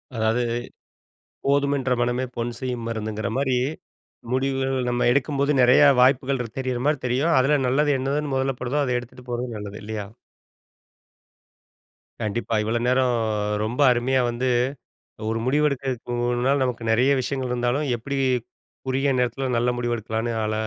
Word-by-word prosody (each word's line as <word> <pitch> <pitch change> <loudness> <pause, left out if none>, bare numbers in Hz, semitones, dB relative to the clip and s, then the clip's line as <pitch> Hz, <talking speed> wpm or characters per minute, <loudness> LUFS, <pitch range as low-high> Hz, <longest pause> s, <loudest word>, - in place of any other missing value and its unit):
அதாவது, 110 +2 +1 1.0
"போதும் 140 0 +2
என்ற 130 -1 -2
மனமே 120 +2 0
பொன் 120 0 -3
செய்யும் 125 -3 -3
மருந்துங்கிற" 110 -1 -3
மாரி, 130 -2 +1 0.7
முடிவுகள் 135 -1 0
நம்ம 120 0 +1
எடுக்கும்போது 140 +2 +1
நெறையா 125 +4 +7
வாய்ப்புகள் 130 0 +3 0.2
தெரியிற 130 -2 -2
மாதிரி 150 -3 +1
தெரியும். 135 +7 +1
அதில 140 +2 +3
நல்லது 145 +3 +2
என்னதுன்னு 140 +1 -1
மொதல்ல 135 0 0
படுதோ 130 +4 -1
அத 125 -2 0
எடுத்துட்டு 125 +1 -13
போறது 120 -1 -3
நல்லது 105 0 -7
இல்லையா? 105 -1 -4 2.2
கண்டிப்பா. 110 +2 -2
இவ்வளோ 115 +2 0
நேரம் 125 -1 +3 0.5
ரொம்ப 120 +6 -2
அருமையா 125 +2 +2
வந்து 120 +2 -2 0.8
ஒரு 115 0 -1
முடிவெடுக்கிறதுனால 130 -2 0
நமக்கு 125 -2 -2
நெறைய 125 +5 +3
விஷயங்கள் 130 -1 -3
இருந்தாலும், 125 +4 0
எப்டி 140 +4 -4 0.7
குறுகிய 135 +2 +1
நேரத்தில 125 +2 -1
நல்ல 120 +1 +2
முடிவு 120 -1 -1
எடுக்கலாம்ன்னு 115 +1 -3
அழ 110 - -1
125 Hz, 130 wpm, -24 LUFS, 120-135 Hz, 2.2 s, நெறையா